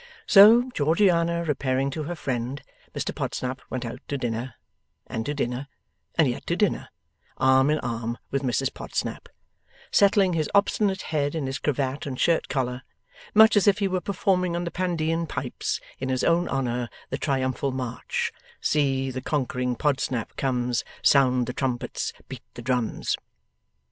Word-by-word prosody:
So, 230 +5 +7
Georgiana 170 +1 +2
repairing 135 -3 0
to 155 +2 -4
her 175 +3 -4
friend, 130 -2 -3 0.3
Mr - - -2
Podsnap 130 +1 -3
went 130 -1 -3
out 115 +2 -6
to 140 - -2
dinner, 120 0 -3 0.5
and 115 - -4
to 145 - -1
dinner, 125 0 -2 0.5
and - - +5
yet - - -4
to - - +1
dinner, - - 0 0.5
arm 130 +1 +4
in 155 - +3
arm 115 0 -3
with 140 - 0
Mrs 130 0 0
Podsnap: - - -4 0.6
settling 200 -2 +4
his 155 -3 0
obstinate 200 -1 +2
head 145 0 0
in 155 -4 -2
his 135 +1 -3
cravat 140 -1 -1
and 130 -2 -5
shirt 170 -1 +2
collar, 125 -2 -1 0.5
much 220 +1 +8
as 205 0 +4
if 200 -1 +5
he 200 -2 +1
were 185 -1 -1
performing 185 -3 0
on 175 - -1
the 170 - -4
Pandean 165 -2 -1
pipes, 140 -4 -3 0.2
in 130 - -3
his 130 -1 0
own 170 +1 +2
honour, 125 -3 -1 0.2
the 130 - -2
triumphal 135 -1 0
march, 125 -2 -3 0.3
See 135 -3 +1
the 130 0 -5
conquering 125 -3 -1
Podsnap 130 -4 -1
comes, 125 -3 0 0.2
Sound 130 -3 +4
the 125 - -4
trumpets, 125 -2 -2 0.2
beat - - -8
the - - -8
drums! 125 -3 0
135 Hz, 160 wpm, -25 LUFS, 125-170 Hz, 0.6 s, much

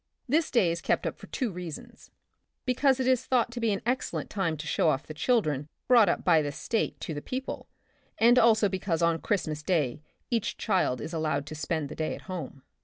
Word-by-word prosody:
This 310 +5 +2
day 205 -9 +3
is 170 0 -3
kept - - 0
up - - -3
for - - -11
two 250 -6 -2
reasons 175 -4 -8 0.3
— - - -52
because 265 +1 +2
it 260 - 0
is 255 -2 +3
thought 245 -2 +1
to 240 - -5
be 230 -2 +1
an 200 - -2
excel 255 +2 -1
lent - - -5
time 170 -6 -1
to 155 - -6
show 160 - +2
off 135 0 0
the 155 - -7
children 155 - 0 0.2
brought 235 -4 +6
up - - 0
by 165 -3 +5
the 145 -1 -2
State 225 +9 -2
to 160 - -4
the 145 - -5
people, 260 - -5 0.5
and 240 +2 +6
also 220 -3 +5
because 185 -3 -1
on 170 -1 +2
Christmas 155 -8 -1
Day 150 -6 0 0.3
each 235 -1 -1
child 185 - +1
is 165 - -6
allowed 155 -3 -1
to 150 - -8
spend 155 0 -2
the - - -8
day 155 -1 -2
at - - -11
home. 170 -7 -7
180 Hz, 225 wpm, -28 LUFS, 155-235 Hz, 0.5 s, brought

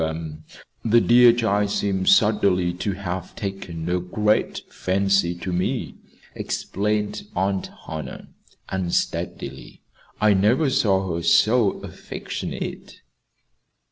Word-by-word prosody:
The 80 -1 -4 0.4
the 115 +1 +5
dear 120 +1 +7
child 105 -3 +1
seems 95 -2 0
suddenly 100 -5 +3
to 95 +3 -2
have 90 -1 -5
taken 95 -5 -5
a 90 +1 +1
great 105 +4 0
fancy 95 -2 +1
to 90 +1 -5
me," 90 +1 -1 0.4
explained 105 +1 -2
Aunt 95 +1 -1 0.2
Hannah, 75 -4 -7 0.4
unsteadily. 85 -7 -3 0.4
"I 105 -1 +5
never 120 +9 +3
saw 95 -8 +1
her 85 - -2
so 110 +5 +4
affectionate." - - -6
95 Hz, 105 wpm, -23 LUFS, 90-105 Hz, 0.4 s, dear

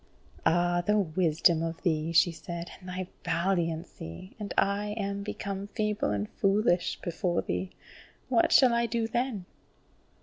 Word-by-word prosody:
"Ah, 175 +1 +3
the 210 +4 +2
wisdom 170 -2 +2
of 165 0 -4
thee," 160 -2 +1
she 170 +1 +5
said, 170 +1 -7
"and 185 -1 -10
thy 185 0 -4 0.2
valiancy, 170 - -2
and 205 -1 -5
I 205 +1 +1
am 200 -1 -2
become 200 -1 -4
feeble 210 0 -1
and 105 0 -1
foolish 195 - +1
before 175 0 -1
thee! 90 +1 -2 0.6
What 240 -3 +3
shall 255 -3 +6
I 235 0 +2
do 230 0 0
then?" 235 -5 -2
185 Hz, 140 wpm, -29 LUFS, 165-210 Hz, 0.6 s, shall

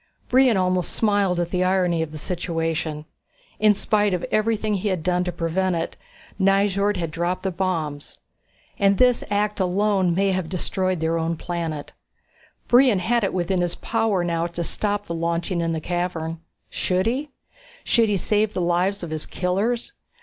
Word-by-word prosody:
Brion 255 -4 +5
almost 185 -1 +1
smiled 205 -5 +2
at 175 -1 -2
the 180 -1 +1
irony 180 -3 +2
of 160 -2 -3
the 155 - -7
situation. 165 -2 -3 0.5
In 210 0 +5
spite 205 -1 +2
of 175 - -3
everything 215 0 +1
he 200 +1 -1
had 185 -5 -1
done 180 0 +1
to 180 - -1
prevent 175 +2 0
it, 165 0 -3 0.4
Nyjord 200 +1 +2
had 165 -3 -3
dropped 175 +3 -2
the 190 - -1
bombs. 165 -6 -3 0.6
And 200 -1 +4
this 250 -1 +4
act 210 +1 0
alone 190 -1 +2
may 195 +1 +2
have 185 -3 -2
destroyed 185 -1 -1
their 165 +1 +1
own 165 0 -1
planet. 165 -3 -4 0.8
Brion 245 -3 +5
had 230 +5 +1
it 195 - +1
within 180 0 0
his 175 -1 0
power 225 -5 0
now 170 -1 0
to 170 0 -4
stop 205 +4 -1
the 170 - -4
launching 170 +2 -1
in 165 0 0
the 160 - -1
cavern. 165 -1 -3 0.3
Should 185 0 0
he? 265 +6 -1 0.5
Should 230 -2 +3
he 205 - +2
save 210 +3 +1
the - - 0
lives 175 +3 +1
of 165 - -5
his 155 -1 -4
killers? 200 +7 -1
185 Hz, 170 wpm, -23 LUFS, 170-205 Hz, 0.8 s, Brion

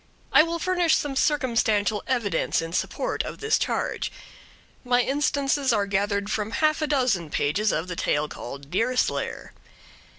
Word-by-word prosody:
I - - +9
will 335 +1 -1
furnish 355 -1 +2
some 285 -2 -2
circumstantial 230 -7 +1
evidence 220 -9 0
in 165 0 -5
support - - -1
of - - -6
this 435 0 +1
charge. - - -2 0.7
My 245 -1 +3
instances 280 0 +1
are 210 -3 +2
gathered 200 +1 0
from 210 -1 -1
half 310 0 +2
a 305 - +1
dozen 250 - +1
pages 195 +10 +1
of 165 - -2
the 180 - -5
tale 150 -2 0
called 140 +1 -9
Deerslayer. 250 +7 -1
235 Hz, 145 wpm, -25 LUFS, 200-290 Hz, 0.7 s, I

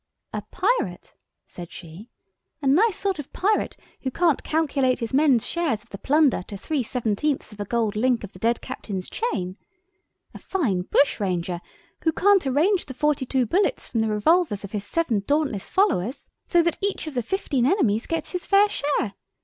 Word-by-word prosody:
"A - - -2
Pirate," 435 +7 -1 0.3
said 175 -1 -9
she, 180 +7 -11 0.5
"a 295 - -7
nice 365 +10 +4
sort 390 -4 -1
of 290 - -7
pirate 415 +3 0 0.2
who 265 - -1
can't 330 +2 +2
calculate 280 -5 +1
his 230 -1 -5
men's 275 -4 +4
share 340 -5 0
of 225 +2 -7
the 200 - -7
plunder 290 - +3
to 200 - -7
three 290 +7 -1
seventeenths 245 +2 -1
of 210 - -15
a 205 - -2
gold 225 -1 0
link 240 +1 +1
of 205 - -8
the 185 - -13
dead 230 +3 +1
captain's 200 -7 -5
chain! 190 - -3 0.8
A - - -9
fine 240 - 0
bushranger 180 -9 +1 0.4
who 320 - +2
can't 390 -1 +3
arrange 335 +9 +2
the 260 - -8
forty 295 -2 +1
two 260 -1 +1
bullets 390 - 0
from 225 - 0
the 220 - +1
revolvers 215 - +2
of 200 - -7
his 210 -2 -4
seven 320 -9 0
dauntless 285 -9 0
followers 280 - 0
so 345 -1 +3
that 340 -1 0
each 400 -3 -1
of 310 - -6
the 245 - 0
fifteen 265 - 0
enemies 245 - +2
gets 330 -1 -3
his 360 -1 -3
fair 405 +1 +5
share! 285 - -1
265 Hz, 180 wpm, -24 LUFS, 215-335 Hz, 0.8 s, fair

